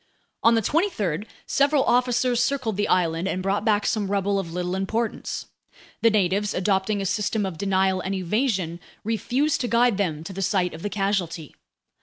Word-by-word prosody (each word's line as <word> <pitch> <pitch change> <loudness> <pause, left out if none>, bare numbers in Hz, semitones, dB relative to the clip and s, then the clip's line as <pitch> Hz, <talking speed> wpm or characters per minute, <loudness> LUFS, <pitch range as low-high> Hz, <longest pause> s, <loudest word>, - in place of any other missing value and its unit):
On 230 0 +5
the 225 - +1
23rd, 215 - 0 0.2
several 280 0 +3
officers 245 0 +2
circled 255 -7 0
the 205 +1 0
island 170 0 +1
and 185 -1 -2
brought 195 +2 0
back 210 -2 +2
some 205 -3 0
rubble 200 0 +1
of 170 -4 -5
little 180 +1 -2
importance. 220 +4 -2 0.6
The 230 - +6
natives, 205 -1 +1
adopting 195 +2 +1
a - - -3
system 210 +2 0
of 175 -4 -5
denial 190 -1 +1
and 195 +1 -2
evasion, 190 -3 -1 0.2
refused 250 +8 0
to 245 - -1
guide 235 -1 +3
them 160 -6 -1
to 190 - -7
the 195 - -5
site 185 -2 +1
of 160 - -9
the 205 - -2
casualty. 195 -6 -2
200 Hz, 175 wpm, -24 LUFS, 185-225 Hz, 0.6 s, The